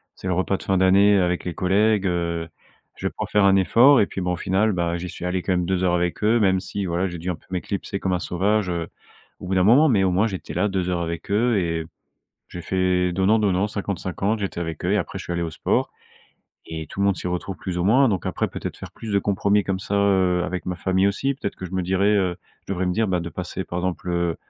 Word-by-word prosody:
c'est - - -7
le 90 - +1
repas 95 +2 0
de - - -11
fin 95 - +1
d'année 100 +2 +5
avec 90 -2 0
les 90 - -4
collègues, 100 +3 +2
heu, 85 -2 -2 0.5
je - - -3
vais - - -3
pouvoir - - -5
faire 105 -1 +4
un 95 0 +5
effort» 120 +8 +6
et - - +4
puis, 95 - -6
bon, 90 0 0
au - - -1
final, 100 +4 +1
bah, 85 -2 -1
j'y 90 +1 -6
suis 90 - -7
allé 90 +1 -1
quand 95 - -1
même 90 -1 0
2 95 +1 0
heures 90 -1 +2
avec 90 +3 -1
eux. 110 +3 +4
Même 95 -3 +3
si, 100 +1 -4
voilà, 90 +2 0
j'ai 90 -1 -6
dû 85 +3 -5
un - - -3
peu - - -24
m'éclipser 95 +2 -4
comme 95 -1 -1
un 90 - 0
sauvage, 100 +3 0
heu, 85 -2 -2 0.5
au - - -8
bout 95 - -1
d'un 90 - +3
moment. 130 +10 +6
Mais 105 -6 +3
au 95 - +2
moins 95 +5 +2
j'étais 95 -4 -6
là 105 - +1
2 95 -2 -1
heures 90 -1 -1
avec 85 +3 -5
eux 115 +2 +2
et 85 -3 -1 0.7
j'ai 90 - -7
fait 90 0 +1
donnant-donnant 100 0 +2
50-50, 100 +1 -2
j'étais 100 -3 -3
avec 80 -2 -5
eux - - +1
et - - +3
après - - -4
je - - -7
suis 85 - -3
allé 85 - -2
au 85 - -3
sport - - 0 0.8
et 80 -1 -6
tout - - -7
le 100 - +3
monde 100 -2 +2
s'y - - -6
retrouve 90 +2 -3
plus 90 -2 -4
ou 90 - 0
moins. 130 +7 +5
Donc, 95 -6 -1
après, - - -1
peut-être - - -6
faire - - -10
plus 110 -2 -7
de 100 - +4
compromis 100 +1 +1
comme 95 -1 -1
ça, 100 - -4
heu, 95 -3 +2
avec 90 0 -4
ma 90 -1 -2
famille 95 +2 +1
aussi, 135 +8 -1
peut-être 130 -7 -5
que - - -8
je 90 - -13
me 95 -1 -1
dirais, 95 +3 +2
heu, 90 -3 0 0.3
je - - -3
devrais 95 -1 -1
me 90 - +1
dire, 110 +3 0
bah, 90 -1 +1
de 85 0 -6
passer 90 +2 -5
par 85 - -5
exemple, 90 0 -3
heu, 85 -1 0
95 Hz, 270 wpm, -23 LUFS, 90-100 Hz, 0.8 s, effort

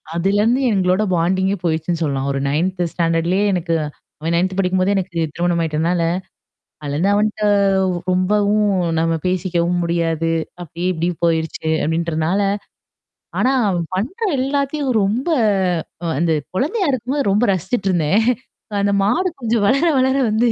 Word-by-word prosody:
அதுலருந்து 205 +8 +2
எங்களோட 185 +1 +2
பாண்டிங்கே 190 +3 +1
போயிடுச்சுன்னு 165 0 -1
சொல்லலாம். 140 -3 -1
ஒரு 140 - -1
9 180 +5 -1
ஸ்டாண்டர்ட்லேயே 170 +3 +1
எனக்கு 170 -2 0 0.4
அவன் 165 +2 -2
9 185 +2 0
படிக்கும்போதே 185 +1 +1
எனக்கு 190 -1 -2 0.2
திருமணம் 175 0 0
ஆயிட்டனால, 165 +2 0 0.8
அதுலருந்து 150 +7 0
அவன்ட்ட 210 +1 0 0.7
ரொம்பவும் 205 +3 +2 0.3
நம்ம 165 0 +1
பேசிக்கவும் 180 -1 0
முடியாது. 165 -1 0 0.3
அப்டி 170 0 -8
இப்டியும் 170 0 -2
போயிருச்சு 160 -1 -1 0.2
அப்டின்றனால 165 +3 0 1.0
ஆனா 255 - +3 0.2
அவன் 175 -3 0
பண்ற 240 - -3 0.2
எல்லாத்தையும் 275 +1 -1
ரொம்ப 220 - -1 0.8
அ - - -1
அந்த 165 +1 +2 0.2
குழந்தையா 340 - 0
இருக்கும்போது 260 +1 -1
ரொம்ப 210 +5 +3
ரசிச்சுட்டுருந்தேன். 190 -1 +1 0.6
அந்த 200 0 +1
மாடு 345 - +2
கொஞ்சம் 230 -3 +1
வளர 275 +9 +3
வளர 260 +1 +2
வந்து 225 +3 +2
185 Hz, 125 wpm, -19 LUFS, 165-210 Hz, 1.0 s, ஆனா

